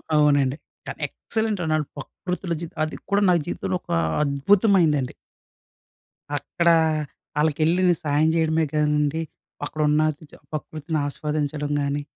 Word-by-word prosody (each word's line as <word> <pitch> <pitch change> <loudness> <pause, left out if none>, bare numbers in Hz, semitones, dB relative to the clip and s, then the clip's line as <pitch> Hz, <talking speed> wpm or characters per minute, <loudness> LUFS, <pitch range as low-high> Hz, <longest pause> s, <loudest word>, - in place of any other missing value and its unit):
అవునండి. 145 -2 +3 0.3
కానీ - - -6
ఎక్సలెంట్ 220 -3 -2
అండి. 160 -1 0
ఆళ్ళు 150 -2 -1
ప్రకృతిలో 180 -1 -4
జీవితం 165 -2 -8
అది 155 - -6 0.2
కూడా 200 +1 +3
నా 180 - +5
జీవితంలో 180 - -2
ఒక - - -10 0.3
అద్భుతమైనదండి. 150 - +3 1.2
అక్కడ 170 +5 -2 0.7
ఆళ్ళకి 150 0 +1
ఎళ్ళి 175 +3 +2
నేను 175 - +3
సాయం 150 +2 +3
చేయడమే 160 -1 +2
కాదండి, 150 +1 +1 0.4
అక్కడ 155 +1 -4
ఉన్న 150 +1 +3 0.5
ప్రకృతిని 155 0 -3
ఆస్వాదించడం 150 0 -2
గానీ, 140 +1 -1
155 Hz, 125 wpm, -24 LUFS, 145-170 Hz, 1.2 s, నా